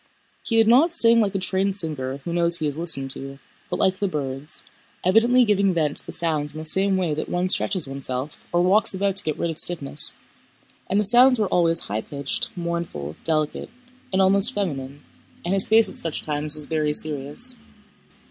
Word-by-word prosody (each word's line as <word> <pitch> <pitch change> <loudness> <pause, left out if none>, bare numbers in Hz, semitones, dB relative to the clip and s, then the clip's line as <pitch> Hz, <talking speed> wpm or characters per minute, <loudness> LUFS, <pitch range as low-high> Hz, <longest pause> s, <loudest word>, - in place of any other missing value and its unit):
He 230 - -3
did 225 -1 +4
not 270 +9 +5
sing 230 -8 +4
like 200 -2 -1
a - - +2
trained 190 +1 -1
singer 140 -7 -5
who 170 - -4
knows 170 0 +5
he 155 - -3
is 145 -2 -2
listened 135 -6 -2
to, 135 0 -1 0.3
but - - -2
like 190 0 +1
the 200 - 0
birds, 140 -3 -3 0.4
evidently 235 +6 +4
giving 200 -3 +1
vent 150 -3 -1
to - - -4
the - - -6
sounds 150 -3 -1
in - - -9
the 155 - -6
same 190 +4 +1
way 175 -5 -1
that 150 - -4
one 175 +1 -1
stretches 185 -4 +1
oneself 135 +1 -5
or 175 0 +2
walks 195 +2 +3
about 195 0 -1
to 200 - +8
get 155 -2 -3
rid 170 - -2
of 160 - -3
stiffness, 150 -4 -1 0.7
and 195 - +1
the - - +2
sounds 250 +4 +6
were 210 - +1
always 165 -1 +2
high 105 +2 -3
pitched, 140 +1 -4
mournful, 170 - -5
delicate, 155 -2 -2 0.4
and 190 0 +2
almost 195 +5 +4
feminine, 145 -8 -4 0.4
and 175 - -1
his 195 -1 +2
face 220 0 +5
at - - -8
such 165 -2 -4
times 150 0 -1
was 150 -1 0
very 155 -1 -1
serious. 150 - -1
170 Hz, 200 wpm, -23 LUFS, 150-195 Hz, 0.7 s, to